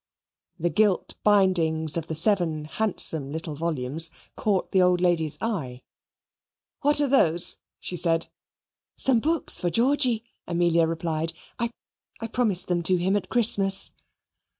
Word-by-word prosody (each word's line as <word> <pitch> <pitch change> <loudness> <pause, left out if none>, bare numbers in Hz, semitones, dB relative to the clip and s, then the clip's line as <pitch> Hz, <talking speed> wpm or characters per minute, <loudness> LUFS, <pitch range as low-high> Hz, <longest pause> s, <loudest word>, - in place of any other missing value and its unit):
The 175 0 -1
gilt 205 +2 +1
bindings 170 -7 +3
of 165 -1 -3
the 160 - -4
seven 165 -3 +1
handsome 160 -6 +1
little 160 0 -5
volumes 155 0 0 0.3
caught 200 -3 -1
the 190 - +3
old 180 -1 +3
lady's 170 -4 0
eye. 140 - -4 1.0
"What 290 +1 +4
are 290 - +2
those?" 175 - +2 0.2
she 180 - -5
said. 165 -1 +1 0.7
"Some 260 -3 +4
books 320 +6 0
for 175 - -1
Georgy," 245 +1 +1 0.2
Amelia 170 -1 +2
replied 165 0 -3 0.3
"I 235 0 -1 0.5
I 225 - -5
promised 220 -5 -1
them 175 -1 0
to 180 +2 +3
him 185 +3 0
at 205 - -3
Christmas." 200 -5 +2
175 Hz, 135 wpm, -25 LUFS, 160-215 Hz, 1.0 s, What